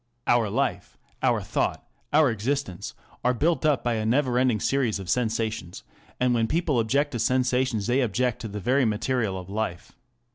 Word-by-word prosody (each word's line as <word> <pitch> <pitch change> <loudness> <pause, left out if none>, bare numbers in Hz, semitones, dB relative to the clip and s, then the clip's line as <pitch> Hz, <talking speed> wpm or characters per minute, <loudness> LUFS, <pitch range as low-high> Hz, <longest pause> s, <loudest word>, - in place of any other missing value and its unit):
Our 120 -3 +3
life, - - -2 0.2
our - - +2
thought, - - -2 0.2
our 150 -4 +5
existence, 115 -4 -3 0.3
are 125 0 +2
built 155 +2 +1
up 145 -3 +2
by 120 - +1
a 110 - -1
never 125 +2 +2
ending 125 -4 +2
series 125 -2 +1
of 95 -3 -4
sensations, 110 -6 -2 0.4
and 125 -1 +2
when 115 -1 +1
people 155 -3 +1
object 140 +6 +1
to 120 - -3
sensations 125 -2 +1
they 125 +3 +2
object 125 +1 0
to 115 - -4
the 105 0 -6
very 130 +7 +2
material 110 -2 0
of 90 -1 -8
life. 100 -3 -4
120 Hz, 175 wpm, -26 LUFS, 110-130 Hz, 0.4 s, our